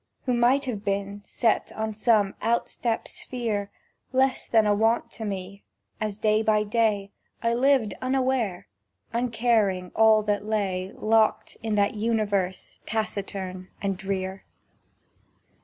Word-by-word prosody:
Who 250 Hz, -, +1 dB
might 245 Hz, +4 st, +3 dB
have 220 Hz, -6 st, -4 dB
been, 200 Hz, 0 st, -2 dB
set 225 Hz, +1 st, 0 dB
on 220 Hz, 0 st, -2 dB
some 210 Hz, -2 st, +2 dB
outstep 230 Hz, 0 st, 0 dB
sphere, 220 Hz, -5 st, -3 dB, 0.4 s
Less 265 Hz, 0 st, +1 dB
than 220 Hz, -2 st, +4 dB
a 210 Hz, -, +4 dB
Want 225 Hz, +3 st, +1 dB
to 220 Hz, -, -6 dB
me, 200 Hz, 0 st, -5 dB, 0.4 s
as 215 Hz, -2 st, -2 dB
day 215 Hz, 0 st, +2 dB
by 215 Hz, -1 st, +3 dB
day 210 Hz, -2 st, +1 dB, 0.3 s
I 230 Hz, 0 st, +2 dB
lived 250 Hz, -4 st, +3 dB
unware, 255 Hz, -7 st, 0 dB, 0.5 s
uncaring 225 Hz, -6 st, +1 dB
all 220 Hz, -1 st, +5 dB
that 205 Hz, -1 st, 0 dB
lay 195 Hz, -3 st, -1 dB
Locked 220 Hz, 0 st, +2 dB
in 220 Hz, -1 st, -1 dB
that 200 Hz, 0 st, +2 dB
Universe 205 Hz, -4 st, -1 dB
taciturn 195 Hz, -4 st, -3 dB
and 195 Hz, -1 st, -1 dB
drear. 190 Hz, 0 st, -4 dB
215 Hz, 125 wpm, -26 LUFS, 200-230 Hz, 0.5 s, all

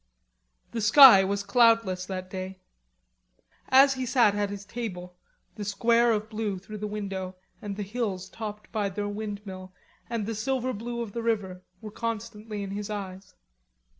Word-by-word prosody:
The 230 Hz, -, -3 dB
sky 225 Hz, -2 st, +9 dB
was 200 Hz, +1 st, -1 dB
cloudless 225 Hz, -6 st, +3 dB
that 185 Hz, -1 st, -6 dB
day. 190 Hz, 0 st, -6 dB, 1.1 s
As 270 Hz, +1 st, +7 dB
he 260 Hz, -1 st, -4 dB
sat 235 Hz, -5 st, +4 dB
at 205 Hz, -1 st, -1 dB
his 200 Hz, 0 st, -7 dB
table 185 Hz, -6 st, -6 dB, 0.4 s
the 210 Hz, -, -4 dB
square 230 Hz, +4 st, +3 dB
of 215 Hz, -1 st, -1 dB
blue 215 Hz, -3 st, -3 dB
through 210 Hz, +3 st, -9 dB
the 210 Hz, -, -3 dB
window 195 Hz, -3 st, -5 dB, 0.3 s
and 205 Hz, -1 st, -5 dB
the 205 Hz, -, -4 dB
hills 200 Hz, -3 st, -3 dB
topped 210 Hz, 0 st, -8 dB
by 210 Hz, -3 st, -1 dB
their 205 Hz, +2 st, -3 dB
windmill 205 Hz, -3 st, -6 dB, 0.4 s
and 230 Hz, -3 st, -2 dB
the 225 Hz, -, -3 dB
silver 255 Hz, +3 st, -1 dB
blue 235 Hz, +3 st, -5 dB
of 225 Hz, -3 st, -5 dB
the 235 Hz, -, -4 dB
river, 205 Hz, -5 st, -2 dB, 0.2 s
were 215 Hz, -1 st, -8 dB
constantly 220 Hz, -2 st, -5 dB
in 195 Hz, -, -6 dB
his 205 Hz, +1 st, -5 dB
eyes. 195 Hz, -2 st, -7 dB
210 Hz, 165 wpm, -27 LUFS, 195-230 Hz, 1.1 s, sky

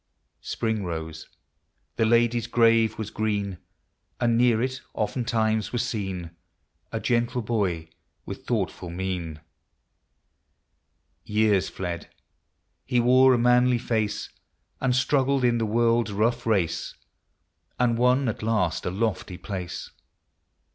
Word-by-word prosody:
Spring 110 Hz, -2 st, -2 dB
rose; 80 Hz, -2 st, -6 dB, 0.3 s
— -, -, -48 dB
the 115 Hz, -, +3 dB
lady's 120 Hz, 0 st, +2 dB
grave 115 Hz, -2 st, +3 dB
was 110 Hz, -1 st, -5 dB
green; 100 Hz, -4 st, -2 dB, 0.6 s
And 120 Hz, -1 st, +2 dB
near 120 Hz, -1 st, +4 dB
it, 130 Hz, +2 st, -2 dB
oftentimes, 110 Hz, -1 st, 0 dB
was 120 Hz, 0 st, 0 dB
seen 95 Hz, -7 st, -4 dB, 0.6 s
A -, -, -2 dB
gentle 120 Hz, 0 st, 0 dB
Boy 95 Hz, -8 st, -1 dB, 0.4 s
with -, -, -8 dB
thoughtful 90 Hz, -, -2 dB
mien. 85 Hz, -3 st, -4 dB, 1.8 s
Years 105 Hz, -3 st, +2 dB
fled; 85 Hz, -3 st, -5 dB, 0.4 s
— -, -, -51 dB, 0.3 s
he 125 Hz, -, +1 dB
wore 130 Hz, +2 st, +6 dB
a -, -, +1 dB
manly 125 Hz, +1 st, +4 dB
face, 110 Hz, -3 st, -2 dB, 0.5 s
And 125 Hz, -2 st, +1 dB
struggled 135 Hz, 0 st, +2 dB
in 120 Hz, -1 st, +3 dB
the 110 Hz, -, 0 dB
world's 115 Hz, 0 st, +2 dB
rough 115 Hz, +4 st, 0 dB
race, 85 Hz, -7 st, 0 dB, 0.8 s
And 120 Hz, -2 st, +3 dB
won 125 Hz, +3 st, +3 dB
at 110 Hz, -, -3 dB
last 110 Hz, -7 st, 0 dB
a -, -, +1 dB
lofty 95 Hz, -2 st, -2 dB
place. 90 Hz, -3 st, -6 dB
110 Hz, 120 wpm, -25 LUFS, 95-120 Hz, 1.8 s, wore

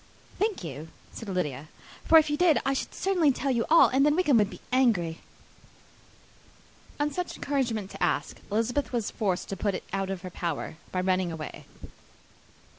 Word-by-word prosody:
"Thank 415 Hz, -, 0 dB
you," 155 Hz, -1 st, -6 dB, 0.3 s
said 225 Hz, -, -7 dB
Lydia; 150 Hz, -6 st, -2 dB, 0.4 s
"for 325 Hz, -, +7 dB
if 310 Hz, -1 st, +4 dB
you -, -, +2 dB
did, 325 Hz, -3 st, +4 dB
I 275 Hz, -, +2 dB
should 270 Hz, -, -4 dB
certainly 360 Hz, -7 st, +2 dB
tell 270 Hz, +1 st, -1 dB
you 235 Hz, -3 st, 0 dB
all, 330 Hz, +1 st, +7 dB
and 265 Hz, +2 st, +3 dB
then 295 Hz, +1 st, +4 dB
Wickham 300 Hz, -8 st, +4 dB
would 205 Hz, -2 st, +2 dB
be -, -, -9 dB
so -, -, -25 dB
angry." 205 Hz, -11 st, +2 dB, 1.8 s
On 295 Hz, 0 st, +1 dB
such 360 Hz, +2 st, -4 dB
encouragement 235 Hz, -8 st, -2 dB
to -, -, -10 dB
ask, -, -, 0 dB
Elizabeth 235 Hz, +6 st, 0 dB
was 235 Hz, -4 st, -1 dB
forced 190 Hz, -4 st, -1 dB
to 195 Hz, -, -3 dB
put 195 Hz, 0 st, -1 dB
it -, -, -5 dB
out 195 Hz, -1 st, -1 dB
of 190 Hz, -1 st, -4 dB
her 185 Hz, -, -6 dB
power, 170 Hz, -2 st, -4 dB
by 185 Hz, -, -1 dB
running 185 Hz, -1 st, +1 dB
away. 160 Hz, -2 st, -7 dB
225 Hz, 185 wpm, -27 LUFS, 185-290 Hz, 1.8 s, for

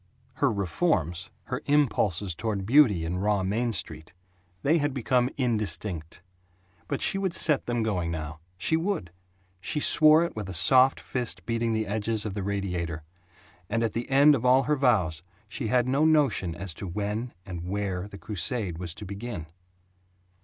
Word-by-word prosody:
Her -, -, +2 dB
"reforms," 90 Hz, -, -1 dB
her -, -, -4 dB
impulses 105 Hz, -, +2 dB
toward 100 Hz, +1 st, -3 dB
beauty 110 Hz, -, +4 dB
in 90 Hz, +2 st, -2 dB
raw 100 Hz, 0 st, +1 dB
Main 115 Hz, +5 st, 0 dB
Street, 90 Hz, -4 st, -4 dB, 0.5 s
they 160 Hz, +4 st, +3 dB
had 145 Hz, -2 st, -1 dB
become 125 Hz, 0 st, +1 dB
indistinct. 100 Hz, -, -2 dB, 0.6 s
But 140 Hz, -, -2 dB
she 195 Hz, -, +1 dB
would 190 Hz, -3 st, -1 dB
set 150 Hz, -6 st, +3 dB
them 120 Hz, -1 st, 0 dB
going 90 Hz, -6 st, -1 dB
now. 75 Hz, -2 st, -5 dB, 0.2 s
She 130 Hz, -, +2 dB
would! 165 Hz, -, -2 dB, 0.5 s
She 150 Hz, -, -2 dB
swore 155 Hz, +2 st, +5 dB
it 170 Hz, -, -4 dB
with 95 Hz, -4 st, -5 dB
soft 130 Hz, +9 st, +5 dB
fist 125 Hz, -3 st, -4 dB
beating 115 Hz, -1 st, -1 dB
the 110 Hz, 0 st, 0 dB
edges 110 Hz, +1 st, -1 dB
of 105 Hz, -, -3 dB
the 100 Hz, -, -4 dB
radiator. 90 Hz, -5 st, -3 dB, 0.7 s
And 115 Hz, 0 st, 0 dB
at 115 Hz, -, -1 dB
the 120 Hz, +3 st, -4 dB
end 140 Hz, +2 st, +6 dB
of 125 Hz, -, -1 dB
all 130 Hz, +1 st, +5 dB
her 150 Hz, +4 st, +1 dB
vows 100 Hz, -, +1 dB, 0.3 s
she 115 Hz, +3 st, -4 dB
had 125 Hz, +2 st, +2 dB
no 135 Hz, +4 st, +2 dB
notion 140 Hz, -, +2 dB
as 90 Hz, -1 st, -6 dB
to 95 Hz, -, -7 dB
when 105 Hz, +6 st, -3 dB
and 90 Hz, -1 st, -6 dB
where 100 Hz, -2 st, -2 dB
the 100 Hz, -, -11 dB
crusade 100 Hz, -2 st, -2 dB
was 85 Hz, -2 st, -5 dB
to 105 Hz, -, -8 dB
begin. 100 Hz, -3 st, -6 dB
105 Hz, 165 wpm, -27 LUFS, 90-130 Hz, 0.7 s, end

